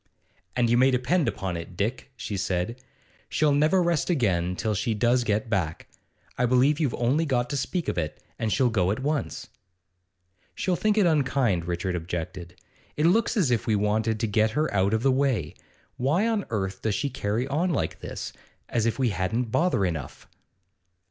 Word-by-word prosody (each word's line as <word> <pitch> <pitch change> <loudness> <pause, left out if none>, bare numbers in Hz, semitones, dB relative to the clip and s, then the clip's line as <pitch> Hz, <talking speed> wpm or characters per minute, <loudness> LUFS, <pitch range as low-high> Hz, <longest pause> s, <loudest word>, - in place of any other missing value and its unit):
'And 120 -1 +2
you 120 +1 +3
may 130 +1 +6
depend 135 +6 +1
upon 95 -2 -2
it, 85 +1 -7
Dick,' 120 +6 -2
she 110 -4 -5
said, 95 +5 -2 0.5
'she'll 155 -1 +2
never 155 +6 +3
rest 170 -2 0
again 90 - +1
till 110 +2 -1
she 110 +2 -1
does 120 +3 +2
get 105 0 0
back. 90 -7 -2 0.5
I 125 - +3
believe 130 +4 +3
you've 145 -6 0
only 130 +7 +1
got 125 -5 0
to - - -1
speak 170 +6 -2
of 85 - -1
it, 75 -2 -4 0.2
and 110 - -1
she'll 125 0 +2
go 95 -5 +1
at 110 +6 -1
once.' 150 0 -2 1.1
'She'll 185 - 0
think 215 +3 +1
it 205 - +5
unkind,' 130 - +1
Richard 90 +1 -2
objected. 90 +1 -5 0.4
'It 150 - +2
looks 225 +7 +3
as 165 -11 +2
if 120 - 0
we 110 - +3
wanted 110 +2 0
to - - +2
get 110 +1 +2
her 155 -4 +1
out 100 +2 +2
of 110 - -2
the 135 - +4
way. 130 - 0 0.4
Why 155 - +2
on 220 -4 0
earth 95 -3 -3
does 110 -2 0
she 140 -2 -1
carry 115 0 -1
on 160 +6 0
like 170 - -1
this? - - -6 0.4
As 115 -1 +1
if 115 - -1
we 130 -3 +2
hadn't 105 +5 -1
bother 165 - +2
enough! 80 -7 -5
120 Hz, 190 wpm, -26 LUFS, 100-140 Hz, 1.1 s, may